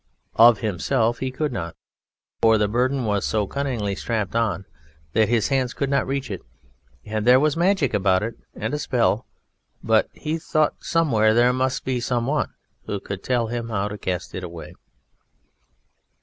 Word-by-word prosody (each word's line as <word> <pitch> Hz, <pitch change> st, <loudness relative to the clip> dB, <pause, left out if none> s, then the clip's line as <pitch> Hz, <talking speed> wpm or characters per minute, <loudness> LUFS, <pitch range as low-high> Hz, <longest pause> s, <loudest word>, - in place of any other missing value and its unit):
Of 115 Hz, +1 st, +7 dB
himself 115 Hz, +3 st, 0 dB
he 130 Hz, -, -2 dB
could 145 Hz, +3 st, -2 dB
not, 85 Hz, -7 st, -4 dB, 0.7 s
for 110 Hz, -1 st, +5 dB
the 105 Hz, -1 st, +2 dB
Burden 125 Hz, +4 st, 0 dB
was 105 Hz, -2 st, 0 dB
so 110 Hz, -2 st, 0 dB
cunningly 120 Hz, -5 st, -2 dB
strapped 100 Hz, +6 st, -2 dB
on 105 Hz, -6 st, 0 dB, 0.5 s
that 110 Hz, 0 st, +3 dB
his 115 Hz, -3 st, +2 dB
hands 130 Hz, -3 st, 0 dB
could 140 Hz, -1 st, -1 dB
not 140 Hz, -, +1 dB
reach 135 Hz, -3 st, -2 dB
it, 95 Hz, -, -5 dB, 0.6 s
and 110 Hz, 0 st, -2 dB
there 125 Hz, +2 st, +6 dB
was 150 Hz, 0 st, +2 dB
magic 175 Hz, -5 st, +2 dB
about 95 Hz, -2 st, +2 dB
it, 115 Hz, +2 st, -3 dB, 0.2 s
and 110 Hz, +5 st, -3 dB
a 150 Hz, -, -1 dB
spell; 120 Hz, -5 st, +1 dB, 0.6 s
but -, -, +3 dB
he 160 Hz, +2 st, -3 dB
thought 155 Hz, -1 st, 0 dB
somewhere 115 Hz, -10 st, +3 dB
there 120 Hz, +1 st, +4 dB
must 130 Hz, 0 st, -1 dB
be 130 Hz, -2 st, 0 dB
someone 125 Hz, +4 st, 0 dB, 0.4 s
who 100 Hz, -, -2 dB
could 100 Hz, 0 st, -6 dB
tell 120 Hz, 0 st, 0 dB
him 115 Hz, 0 st, -4 dB
how 105 Hz, -2 st, -1 dB
to 105 Hz, -, -6 dB
cast 90 Hz, -1 st, -3 dB
it 95 Hz, -, -5 dB
away. 85 Hz, -2 st, -8 dB
115 Hz, 170 wpm, -23 LUFS, 105-130 Hz, 0.7 s, Of